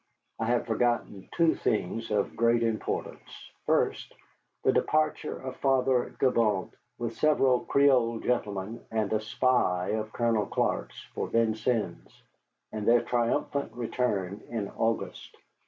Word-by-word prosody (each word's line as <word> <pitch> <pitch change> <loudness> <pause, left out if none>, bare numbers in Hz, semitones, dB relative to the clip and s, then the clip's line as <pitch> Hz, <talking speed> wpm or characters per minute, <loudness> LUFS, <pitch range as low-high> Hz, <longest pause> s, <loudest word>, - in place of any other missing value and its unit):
I 110 - 0
have 120 +1 +1
forgotten 115 -4 -1
two 165 -1 +3
things 110 +2 -1
of 105 -2 0
great 115 0 +3
importance. 115 -1 -4 0.2
First, - - 0 0.5
the - - +4
departure 155 0 0
of 130 -1 -7
Father 130 -2 +1
Gibault 115 -7 +2 0.3
with 115 -1 -4
several 135 -5 +3
Creole 130 -5 +3
gentlemen 105 -3 -2
and 110 -2 -1
a 110 - +1
spy 110 -5 +1
of 110 0 -2
Colonel 115 -4 +1
Clark's - - -1
for - - -3
Vincennes, 115 0 -1 0.5
and 105 -1 -4
their 120 0 +5
triumphant 125 +4 -1
return 110 -5 -2
in 110 -4 -3
August. 115 0 -3
115 Hz, 125 wpm, -28 LUFS, 110-125 Hz, 0.5 s, their